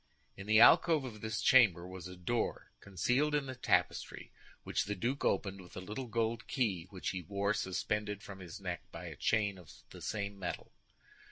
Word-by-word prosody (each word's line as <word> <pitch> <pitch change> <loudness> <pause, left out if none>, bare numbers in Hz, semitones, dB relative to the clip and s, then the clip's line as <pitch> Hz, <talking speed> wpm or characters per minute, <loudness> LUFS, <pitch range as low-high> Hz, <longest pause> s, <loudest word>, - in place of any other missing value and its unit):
In 100 +1 -9
the 110 0 +6
alcove 155 +5 +7
of 110 -5 -8
this 110 0 -2
chamber 100 -10 +5
was 90 -1 -8
a 90 - -9
door 115 +7 -2
concealed 125 - +1
in 145 -2 +1
the 130 - -5
tapestry 95 -8 0 0.3
which - - -1
the 105 - -2
duke 125 +9 -2
opened 95 0 0
with 90 - -13
a - - -2
little 105 +7 -5
gold 115 +1 -1
key 95 -10 -1
which 95 -2 -4
he 95 - -3
wore 100 +3 -1
suspended 105 0 -2
from 100 -1 -9
his 90 -1 -8
neck 90 -4 -4
by - - -8
a - - -7
chain 100 -4 +1
of 85 -5 -14 0.2
the - - -11
same 100 -1 -3
metal. 90 -2 -5
100 Hz, 190 wpm, -34 LUFS, 95-115 Hz, 0.3 s, alcove